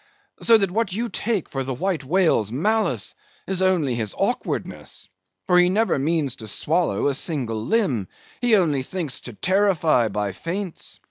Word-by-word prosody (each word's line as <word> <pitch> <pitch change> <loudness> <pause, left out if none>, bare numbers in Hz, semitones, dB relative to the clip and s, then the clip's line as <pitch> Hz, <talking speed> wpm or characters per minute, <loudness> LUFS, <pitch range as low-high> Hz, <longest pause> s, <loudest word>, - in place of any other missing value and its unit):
So 230 -1 +6
that 195 -4 0
what 215 0 0
you 230 +5 -2
take 215 -6 -1
for 135 -1 -3
the 130 0 -3
White 180 +1 -1
Whale's 155 - +2
malice 215 - 0 0.3
is 190 -1 -1
only 180 -8 +2
his 110 -4 -3
awkwardness. - - -3 0.4
For 180 - +5
he 180 0 +5
never 210 -5 +2
means 145 -2 0
to 110 - -8
swallow 155 - 0
a 140 - +2
single 125 -7 -2
limb; 135 - +1 0.3
he 240 -3 +4
only 155 -9 +2
thinks 155 0 -4
to 125 - -8
terrify 175 - +2
by 105 -1 -2
feints. 170 - -4
165 Hz, 160 wpm, -23 LUFS, 130-195 Hz, 0.4 s, So